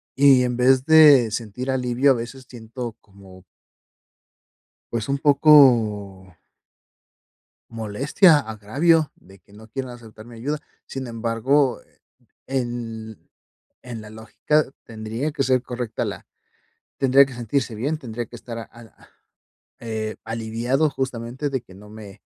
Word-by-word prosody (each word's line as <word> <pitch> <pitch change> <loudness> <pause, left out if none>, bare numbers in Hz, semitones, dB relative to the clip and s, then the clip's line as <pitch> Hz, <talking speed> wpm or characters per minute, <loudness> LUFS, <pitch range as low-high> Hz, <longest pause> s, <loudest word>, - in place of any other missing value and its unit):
Y 135 -2 +6
en 125 -1 -1
vez 130 +1 +3
de 145 -7 +7
sentir 120 +4 -4
alivio, 130 +1 +2
a - - +6
veces 120 +3 -7
siento 115 0 -8
como 95 -2 -17 1.5
pues, 115 +1 -3
un 140 - +1
poco 115 - +4 1.3
molestia, 130 - +3
agravio 140 +9 +1
de 95 +1 -19
que 100 - -27
no 110 +2 -14
quieran 130 +2 -6
aceptar 110 -3 -13
mi 120 0 -13
ayuda. 145 +6 -3 0.3
Sin 135 -1 -6
embargo, 120 +4 0 0.7
en 120 -4 -5 0.6
en 120 -3 -7
la 105 - -11
lógica 115 +7 -1 0.2
tendría 115 +6 -4
que 140 -3 -1
ser 130 -1 +2
correcta 120 -3 -4
la - - -6 0.7
tendría 135 +1 +5
que 135 - -11
sentirse 120 +1 -2
bien. 140 +9 -2
Tendría 120 -4 -6
que 120 - -12
estar 115 0 -8
a 115 - -6
a 115 -1 -17 0.7
eh, 110 -1 -4
aliviado 115 +6 -1
justamente 130 +1 -4
de 135 -1 -2
que 95 - -17
no 105 +2 -14
me 105 -3 -12
120 Hz, 130 wpm, -22 LUFS, 110-135 Hz, 1.5 s, de